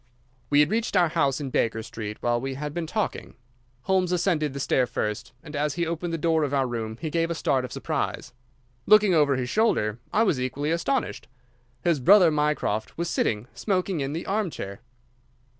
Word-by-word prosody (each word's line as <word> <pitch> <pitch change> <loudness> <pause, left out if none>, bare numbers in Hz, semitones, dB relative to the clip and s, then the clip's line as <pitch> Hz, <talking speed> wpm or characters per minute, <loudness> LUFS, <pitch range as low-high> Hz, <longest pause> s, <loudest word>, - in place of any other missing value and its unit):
We 145 0 +5
had 150 - +2
reached 220 -2 0
our 175 -2 +4
house 140 -2 +1
in 140 -3 -5
Baker 110 -2 0
Street 105 -1 -6
while 120 0 +1
we 135 0 -4
had 150 +1 -5
been 170 -1 -3
talking. 215 +4 -3 0.5
Holmes 185 -2 +1
ascended 165 -5 +1
the 140 - -6
stair 130 -1 +2
first, 105 -2 -3
and 150 -1 -9
as 150 0 0
he 170 -1 0
opened 170 +1 -3
the 165 - -1
door 160 0 +2
of 145 -1 -1
our 135 -1 +2
room 115 -3 -4
he 160 -2 -4
gave 165 0 +1
a 170 - -2
start 140 -6 +1
of 125 - -6
surprise. - - -3 0.5
Looking 215 -3 +6
over 145 -4 +4
his 125 -1 -2
shoulder, 120 - +1
I 220 - +3
was 155 - +1
equally 145 +4 -2
astonished. 170 +11 -1 0.6
His 170 -5 +2
brother 180 +5 +6
Mycroft 150 -8 -1
was 170 0 -2
sitting 105 +1 0
smoking 185 -3 -1
in 135 +1 -2
the 165 - -4
armchair. 175 - -3
150 Hz, 190 wpm, -25 LUFS, 130-175 Hz, 0.6 s, Looking